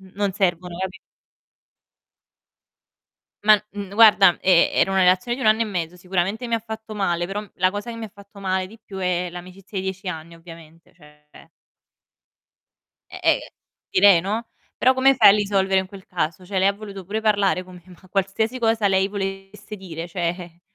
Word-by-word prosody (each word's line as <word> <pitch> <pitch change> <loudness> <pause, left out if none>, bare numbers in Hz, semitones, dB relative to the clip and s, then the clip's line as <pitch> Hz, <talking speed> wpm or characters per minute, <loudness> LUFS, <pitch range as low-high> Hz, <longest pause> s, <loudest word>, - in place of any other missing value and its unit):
non 200 -1 0
servono, 180 -3 -1
capi 190 +1 -5 2.5
Ma, 215 - +8 0.2
mhmm, 200 -1 -7
n - - -8
guarda, 205 -5 +6
e 180 -2 +4
era - - +2
una 190 0 +2
relazione 185 +6 +2
di 260 - -6
1 - - 0
anno 220 +1 +3
e - - +3
mezzo. 180 -4 -4
Sicuramente 190 +6 -2
mi 230 - 0
ha - - +1
fatto 220 0 -8
male, 175 -4 -1
però, 195 +2 -4
mhmm, 210 - -13
la 185 0 +2
cosa 205 +4 -6
che 230 - -7
mi 230 - -6
ha 215 - -9
fatto 200 0 -15
male 190 -1 -1
di 220 +4 -15
più 195 -1 -9
è 180 -1 -1
l'amicizia 185 +3 -9
di 190 - -4
10 190 0 -5
anni, 170 -1 -7
ovviamente, 165 0 -15
cioè 150 -3 -19 1.6
E - - -8
ehm, - - +4 0.5
direi 185 -2 +6
no, 215 +5 -3 0.3
però 260 - +4
come 265 +1 +4
fai 260 - +8
a - - +7
risolvere 195 -2 +1
in 190 - -7
quel 190 0 -13
caso, 170 0 -3
cioè 190 +1 -3
lei 190 +1 +4
ha - - +2
voluto 200 -2 -9
pure 215 +2 -2
parlare 200 -3 +2
con 185 0 -14
me, 180 - -14
ma 185 0 -17
qualsiasi 205 +5 -1
cosa 225 -3 +1
lei 190 0 +2
volesse 195 +1 -6
dire, 170 -3 -7
cioè, 175 0 -4
195 Hz, 190 wpm, -22 LUFS, 180-210 Hz, 2.5 s, Ma